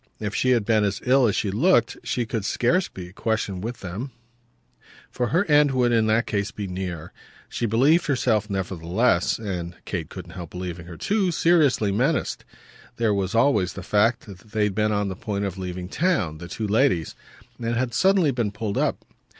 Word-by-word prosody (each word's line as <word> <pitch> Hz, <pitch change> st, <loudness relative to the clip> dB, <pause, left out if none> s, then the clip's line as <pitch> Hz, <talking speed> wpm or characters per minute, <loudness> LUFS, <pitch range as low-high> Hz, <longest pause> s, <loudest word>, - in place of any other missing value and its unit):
If 105 Hz, -1 st, -3 dB
she 130 Hz, -, +1 dB
had 120 Hz, -5 st, +3 dB
been 110 Hz, -1 st, +3 dB
as 100 Hz, -1 st, -1 dB
ill 130 Hz, 0 st, +4 dB
as 105 Hz, -, 0 dB
she 100 Hz, -, 0 dB
looked 165 Hz, -, +3 dB
she 120 Hz, -2 st, -1 dB
could 115 Hz, -2 st, -3 dB
scarce 170 Hz, -, +1 dB
be 90 Hz, -2 st, -9 dB
a -, -, -17 dB
question 100 Hz, -4 st, -2 dB
with 115 Hz, +4 st, -5 dB
them, 100 Hz, +9 st, -5 dB, 1.0 s
for 125 Hz, -, -1 dB
her 175 Hz, +10 st, +2 dB
end 150 Hz, -1 st, +5 dB
would 125 Hz, -2 st, +2 dB
in 115 Hz, -2 st, +3 dB
that 110 Hz, +2 st, +2 dB
case 100 Hz, -1 st, -1 dB
be 105 Hz, -1 st, -6 dB
near. 90 Hz, -3 st, -5 dB, 0.4 s
She 120 Hz, -, -2 dB
believed 140 Hz, +11 st, +3 dB
herself 115 Hz, -6 st, +1 dB
nevertheless 95 Hz, +2 st, 0 dB
and 90 Hz, -5 st, -5 dB
Kate 85 Hz, -5 st, -4 dB
couldn't 90 Hz, -2 st, -9 dB
help 85 Hz, -4 st, -7 dB
believing 90 Hz, -2 st, -6 dB
her 85 Hz, -2 st, -9 dB
too 200 Hz, -3 st, +1 dB
seriously 155 Hz, -, +3 dB
menaced. 130 Hz, +9 st, 0 dB, 0.5 s
There 115 Hz, -3 st, +1 dB
was 100 Hz, +1 st, -1 dB
always 115 Hz, -7 st, +3 dB
the 95 Hz, -, -8 dB
fact 105 Hz, +4 st, +2 dB
that 100 Hz, -3 st, -11 dB
they 105 Hz, +2 st, -2 dB
had 105 Hz, -2 st, +1 dB
been 105 Hz, +1 st, +1 dB
on 105 Hz, -1 st, 0 dB
the 95 Hz, -, -4 dB
point 100 Hz, 0 st, -3 dB
of 95 Hz, -1 st, -5 dB
leaving 90 Hz, -1 st, -5 dB
town, 100 Hz, -, 0 dB
the 85 Hz, -, -8 dB
two 110 Hz, +5 st, -4 dB
ladies, 105 Hz, -, +2 dB, 0.5 s
and 115 Hz, 0 st, -1 dB
had 120 Hz, 0 st, -1 dB
suddenly 190 Hz, -, +3 dB
been 120 Hz, -5 st, -1 dB
pulled 105 Hz, -1 st, -3 dB
up. -, -, -1 dB
105 Hz, 195 wpm, -24 LUFS, 95-125 Hz, 1.0 s, end